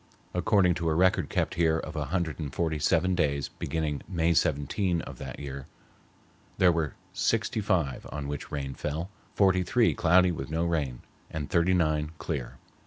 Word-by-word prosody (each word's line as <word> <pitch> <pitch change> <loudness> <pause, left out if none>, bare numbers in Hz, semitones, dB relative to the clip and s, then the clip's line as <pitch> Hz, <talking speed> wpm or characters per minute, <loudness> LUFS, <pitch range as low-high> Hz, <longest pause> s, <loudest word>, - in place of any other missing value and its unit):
According 90 0 +3
to 85 - +1
a 80 - +1
record 90 +2 +3
kept - - 0
here 80 -2 +2
of 80 -1 -6
a 75 -2 -1
hundred 85 +1 -2
and 75 -4 -4
forty 80 -1 -1
seven 85 +4 +2
days 70 -5 0
beginning 75 -1 -3
May 85 -2 +1
17 85 +3 +1
of - - -9
that - - -6
year, 70 -1 -6 0.9
there 90 -1 +5
were 80 -3 -1 0.2
sixty - - 0
five 65 -3 0
on 75 -1 -4
which 70 -1 -5
rain 70 -2 -3
fell, 80 +7 -4 0.2
forty 95 -2 +4
three 115 +6 +3
cloudy 90 +2 +4
with 70 -5 -5
no 80 +2 0
rain, 75 -7 -1 0.3
and 75 -2 -5
thirty 85 +2 +3
nine 75 -2 +1
clear. 70 -7 -4
80 Hz, 175 wpm, -28 LUFS, 75-90 Hz, 0.9 s, there